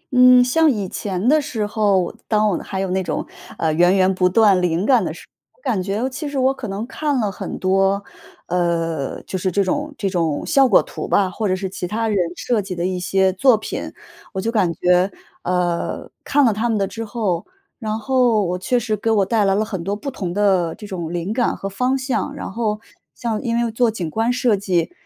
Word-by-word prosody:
嗯， 250 0 +8
像 315 +6 +3
以 205 -8 -1
前 190 +2 -3
的 305 +3 +5
时 245 -8 -3
候， 205 -4 +1
当 215 -1 +2
我 200 - +1
还 190 -1 -4
有 190 - -2
那 190 +1 +1
种， - - -3 0.3
呃， 160 -1 0
源 175 +4 +4
源 190 0 +3
不 180 -1 +2
断 200 -1 +4
灵 175 +1 0
感 245 -5 +4
的 - - -2
时 160 - -11
候， - - -45
我 - - -31
感 205 -6 0
觉 205 +6 -1
其 290 +3 -4
实 285 - -4
我 260 +1 +3
可 250 -4 -7
能 200 +3 -4
看 285 +1 -1
了 210 -4 0
很 - - -6
多， 195 +1 +2 0.4
呃， 165 -4 -1
就 190 - -4
是 185 0 -1
这 200 +3 +2
种 295 +10 -2
这 200 - -1
种 165 -6 -1
效 270 -1 +4
果 205 - +5
图 - - -6
吧， 190 -2 +2
或 215 +2 -2
者 185 - +1
是 190 0 -3
其 185 -1 -5
他 225 +4 -1
人 210 - 0 0.2
设 235 +1 0
计 190 -2 -6
的 170 0 -2
一 185 0 -1
些 190 +1 +2
作 240 +4 +4
品。 215 - -5 0.4
我 190 - -3
就 225 +4 -1
感 195 -7 +2
觉， 180 +3 +2 0.3
呃， 180 -1 -1 0.2
看 285 -1 +3
了 225 - +3
他 220 +3 -1
们 225 - +1
的 200 - +1
之 225 +4 -6
后， 205 -6 -2 0.3
然 215 -2 -2
后 245 -3 +2
我 180 +1 -2
确 245 +6 +1
实 215 -2 -1
给 220 +2 -2
我 205 -3 +3
带 215 +1 +2
来 195 0 +3
了 215 +1 +1
很 190 -6 -5
多 200 +2 -2
不 275 +7 -5
同 185 -9 -4
的 185 -4 +2
这 210 - -10
种 175 -5 -5
灵 175 +4 -2
感 245 -1 +1
和 195 - -5
方 250 +7 0
向， 265 -1 -2
然 - - -6
后 215 0 -1 0.4
像 225 -3 -2
因 235 -3 -1
为 235 - +2
又 230 - -1
做 235 +1 +2
景 180 -8 -4
观 225 +5 +1
设 245 -3 +2
计， 190 - 0
205 Hz, 250 characters per minute, -20 LUFS, 185-235 Hz, 0.4 s, 嗯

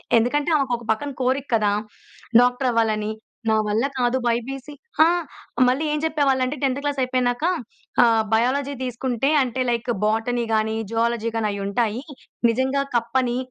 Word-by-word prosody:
ఎ - - +7
ఎందుకంటే 290 +7 0
ఆమెకొక 250 -4 -1
పక్కన 285 +6 -2
కోరిక 265 +2 0
కదా! 210 -2 +2 0.7
డాక్టర్ 250 +1 +2
అవ్వాలని. 215 -2 0 0.4
నా 220 - +4
వల్ల 215 +5 +1
కాదు 245 0 +1
బైపీసీ 255 +4 -2 0.3
ఆ! - - +6 0.6
మళ్ళీ 265 +5 +1
ఏం 300 - 0
చెప్పేవాళ్ళంటే 275 -3 +1
10థ్ 270 0 +1
క్లాస్ 285 -1 -1
అయిపోయినాక 250 +1 0 0.6
ఆహ్, 225 -2 +4
బయాలజీ 260 +5 +1
తీసుకుంటే 250 +1 -1
అంటే, 255 +1 -3
లైక్ 235 +1 -1
బోటనీ 225 +3 0
కానీ, 220 0 +1 0.2
జువాలజీ 230 0 0
గాని 225 -1 0
అయి 200 0 -4
ఉంటాయి. 220 +3 -1 0.5
నిజంగా 260 +4 +1
కప్పని 240 +1 +1
245 Hz, 140 wpm, -23 LUFS, 230-265 Hz, 0.7 s, ఎ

